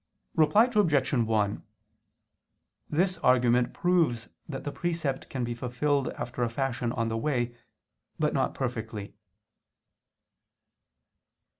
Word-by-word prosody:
Reply 160 +9 +5
Obj. 155 - +3
1: 110 -4 +1 1.3
This 180 +3 +1
argument 125 -3 +3
proves 160 -11 +1 0.2
that 135 -3 -5
the 145 - -3
precept 160 -5 -2
can 130 -2 -3
be 120 0 -2
fulfilled 130 +4 0
after 120 +1 -4
a 120 - +2
fashion 120 -1 -1
on 115 -2 -1
the 115 - -1
way, 120 -2 -1 0.6
but - - +1
not - - 0
perfectly. 110 -5 -4
125 Hz, 110 wpm, -28 LUFS, 120-150 Hz, 1.3 s, Reply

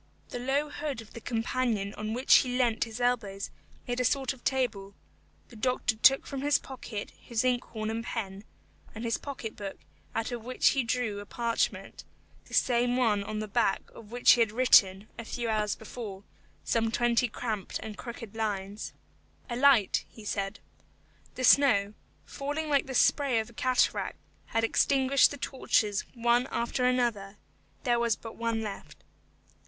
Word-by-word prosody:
The 245 - -5
low 280 +4 0
hood 290 -5 -4
of 225 -2 -12
the 230 - -9
companion 225 -3 -1
on 215 +1 -4
which 255 +3 +6
he 250 -1 0
leant 235 -3 +2
his 225 +1 -8
elbows 220 -5 -1 0.4
made 245 0 -2
a - - +2
sort 265 +1 +1
of 260 - -18
table; 215 -7 -1 0.5
the 240 - -14
doctor 245 0 0
took 265 +5 +5
from 275 -1 -5
his 290 +1 +3
pocket 235 -5 -7
his 235 0 -3
inkhorn 240 -3 -1
and 225 +1 -3
pen, 200 -4 -5 0.5
and 220 - -6
his 230 - 0
pocket 255 -6 -6
book 200 -2 -6 0.4
out 225 +1 -1
of 240 -2 -5
which 255 +2 +3
he 270 - +1
drew 230 -4 -1
a 205 - -9
parchment, 235 +1 -2 0.4
the - - -6
same 245 -1 +2
one 215 -5 +2
on 215 +1 -5
the 215 0 -3
back 210 -1 0
of 215 - -13
which 245 0 +5
he - - +5
had 225 -2 +3
written, 210 -5 +5
a - - -4
few 235 +1 -4
hours 215 -2 0
before, 215 -3 -8 0.4
some 225 -1 +1
twenty 240 +1 +2
cramped 215 -4 -4
and 215 -1 -7
crooked 230 -3 -8
lines. 205 -2 -3 0.6
"A - - -1
light," 250 -6 +4
he 220 - -13
said. 200 0 -3 0.8
The 255 - -4
snow, 220 -7 +5 0.3
falling 295 +2 -4
like 280 -2 +2
the 265 - -5
spray 275 -1 +3
of 220 +1 -5
a - - -19
cataract, 255 +2 +1 0.3
had 225 - 0
extinguished 270 +3 +4
the 285 - -7
torches 225 -5 0
one 240 +2 +2
after 245 +1 -1
another; 235 -6 0 0.5
there 240 -2 +2
was 235 -2 +2
but 225 - -10
one 230 -1 -1
left. 205 -2 -8
235 Hz, 170 wpm, -29 LUFS, 215-255 Hz, 0.8 s, which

